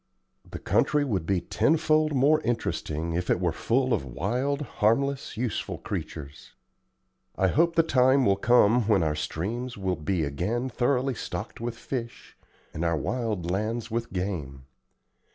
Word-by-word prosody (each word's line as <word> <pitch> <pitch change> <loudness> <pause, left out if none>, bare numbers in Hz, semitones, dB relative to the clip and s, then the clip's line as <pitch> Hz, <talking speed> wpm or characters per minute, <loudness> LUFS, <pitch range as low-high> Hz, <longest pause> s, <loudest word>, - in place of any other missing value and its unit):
The - - -6
country 150 -1 +2
would 95 - -2
be 95 -3 +1
tenfold 155 - +2
more 145 +4 +4
interesting 85 - -2
if 90 +1 -2
it - - +3
were 90 -2 +1
full 125 +9 +1
of - - 0
wild, 120 - -2
harmless, 135 +3 0
useful 120 -2 -2
creatures. 75 -1 -7 0.8
I 95 - +2
hope 170 - +2
the 165 - +5
time 130 -3 +4
will 100 - +4
come 115 +1 +4
when 100 -6 +4
our 75 -1 +1
streams 110 +11 -4
will 95 -2 -1
be 80 +2 -1
again 100 - -2
thoroughly 130 +2 +1
stocked 115 +1 -6
with 115 0 -4
fish, 120 -2 -6 0.4
and 80 - -3
our 85 -1 +1
wild 105 - -2
lands 110 +4 -2
with 115 +1 -2
game. 80 -9 -4
115 Hz, 150 wpm, -27 LUFS, 90-130 Hz, 0.8 s, the